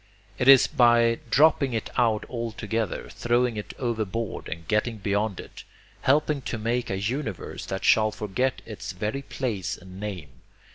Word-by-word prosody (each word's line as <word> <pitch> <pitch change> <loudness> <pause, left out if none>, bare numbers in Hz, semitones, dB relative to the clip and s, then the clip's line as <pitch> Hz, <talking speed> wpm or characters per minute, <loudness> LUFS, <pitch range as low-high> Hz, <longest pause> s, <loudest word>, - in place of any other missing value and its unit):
It 125 - +1
is 135 -2 +9
by 120 -1 +4
dropping 140 -1 +4
it 110 - -3
out 115 -4 +2
altogether, 115 -3 -3
throwing 120 0 +1
it 105 - -6
overboard 115 -3 -3
and 85 0 -7
getting 110 +2 0
beyond 100 0 -1
it, - - -10 0.4
helping 150 +1 +2
to 120 - -4
make 115 +3 -1
a 95 - -1
universe 110 - -4
that 95 +1 -3
shall 110 -1 +5
forget 110 +4 -2
its 105 -4 -7
very 105 +8 -3
place 120 -9 -3
and 95 +1 -12
name. 95 -9 -6
115 Hz, 150 wpm, -26 LUFS, 105-125 Hz, 0.4 s, is